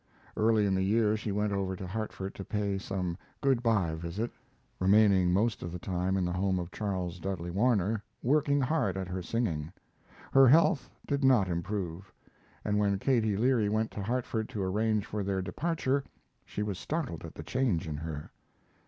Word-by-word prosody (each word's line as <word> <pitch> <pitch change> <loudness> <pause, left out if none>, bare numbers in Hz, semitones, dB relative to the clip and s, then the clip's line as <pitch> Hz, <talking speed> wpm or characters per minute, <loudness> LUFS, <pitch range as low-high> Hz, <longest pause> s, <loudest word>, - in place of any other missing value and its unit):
Early 110 -1 +3
in 100 - +2
the 95 - +1
year 105 +2 +3
she 110 -1 -3
went 105 0 0
over 95 -1 -1
to 95 - -6
Hartford 100 -1 -4
to 95 - -7
pay 100 -1 -1
some 95 -2 -3 0.2
good 135 -4 +2
by 105 -9 +2
visit, 85 +8 -3 0.5
remaining 95 -2 +5
most 110 +5 +1
of 85 - -5
the 90 - -4
time 90 +1 -1
in 95 - +1
the 90 - -1
home 95 +1 +1
of 90 0 -4
Charles 95 -4 -3
Dudley 90 -1 -3
Warner, 105 0 +2 0.2
working 145 +2 +3
hard 130 - +1
at 95 -1 -3
her 90 0 -3
singing. 85 -7 -2 0.6
Her 135 -1 +7
health 155 +1 +4 0.2
did 140 0 -1
not 125 -8 +5
improve, 90 +1 -3 0.5
and 105 0 +1
when 100 -1 +2
Katie 110 -3 +1
Leary 115 -2 +3
went 110 +1 0
to 105 - -5
Hartford 115 0 -2
to 105 -6 -3
arrange 105 +2 +1
for 105 - -3
their 95 -1 -1
departure 140 - -1 0.4
she 105 - -3
was 100 -3 -3
startled 145 - -3
at - - -9
the - - -7
change 115 -12 0
in 75 -2 -3
her. 75 -1 -6
100 Hz, 180 wpm, -30 LUFS, 95-115 Hz, 0.6 s, Her